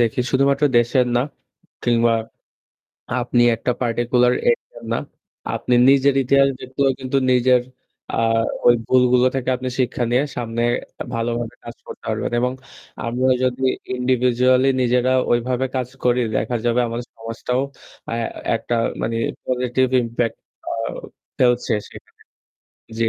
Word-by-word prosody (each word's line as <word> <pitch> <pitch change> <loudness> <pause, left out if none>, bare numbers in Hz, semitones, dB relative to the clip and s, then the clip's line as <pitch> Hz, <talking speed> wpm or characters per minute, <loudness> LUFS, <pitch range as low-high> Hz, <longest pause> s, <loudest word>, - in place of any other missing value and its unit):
দেখি 120 +1 +1
শুধুমাত্র 140 +2 +2
দেশের 125 +2 +2
না 120 - +3 0.6
কিংবা 115 -1 +3 1.1
আপনি 120 0 +2
একটা 125 - -1
particular 120 +1 +2 0.2
area - - -3
না, - - +1 0.6
আপনি 125 - 0
নিজের 140 0 +5
ইতিহাস 140 +2 +4
দেখলেও 135 +1 0
কিন্তু 130 +1 -2 0.2
নিজের 125 0 +4 0.5
আ - - 0 0.5
ওই 120 - +8
ভুলগুলো 125 0 +4
থেকে 130 -1 -3
আপনি 130 0 -4
শিক্ষা 125 -1 0
নিয়ে 125 +4 +3
সামনে 115 -1 -2 0.5
ভালোভাবে 115 0 -2
কাজ 120 - -9
করতে - - -10
পারবেন - - -2
এবং 125 +1 0 0.5
আমরা 125 +2 +1
যদি 130 +1 -1 0.3
individually 125 +1 +2
নিজেরা 125 +1 +2 0.2
ওইভাবে 125 +2 0
কাজ 125 -2 -1 0.2
করি, 125 0 +3 0.2
দেখা 115 +3 -1
যাবে 120 +1 +2
আমাদের 120 +1 -5
সমাজটাও 115 +3 -3 0.5
অ্যা 115 - -2 0.4
একটা 120 +1 -2 0.3
মানে 115 0 -1 0.3
positive 125 0 0
impact 115 0 -2 0.3
আউ 115 0 -3 0.4
ফেলছে 125 -1 +2
সেখানে। - - -16 0.8
জি। 115 -1 +2
125 Hz, 125 wpm, -21 LUFS, 120-130 Hz, 1.1 s, ওই